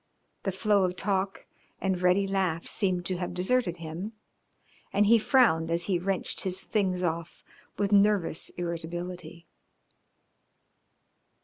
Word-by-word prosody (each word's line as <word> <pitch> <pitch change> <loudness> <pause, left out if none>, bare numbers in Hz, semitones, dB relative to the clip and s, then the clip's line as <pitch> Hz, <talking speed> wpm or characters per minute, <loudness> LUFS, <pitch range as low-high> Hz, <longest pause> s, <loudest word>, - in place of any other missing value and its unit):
The 195 - -1
flow 200 +1 +2
of 180 -1 0
talk 195 0 -1 0.3
and 190 -2 -1
ready 180 +2 +4
laugh 190 -4 0
seemed 180 -3 -1
to 185 +1 -1
have 175 0 -4
deserted 185 -1 +1
him, 170 +6 -6 0.8
and 205 - +3
he 230 +2 +6
frowned 210 - +3
as 170 +1 0
he 185 -2 0
wrenched 190 0 -1
his 185 0 -3
things 185 -4 0
off 170 0 -3 0.3
with 200 0 0
nervous 200 -5 +3
irritability. 175 0 -5
185 Hz, 125 wpm, -28 LUFS, 175-200 Hz, 0.8 s, he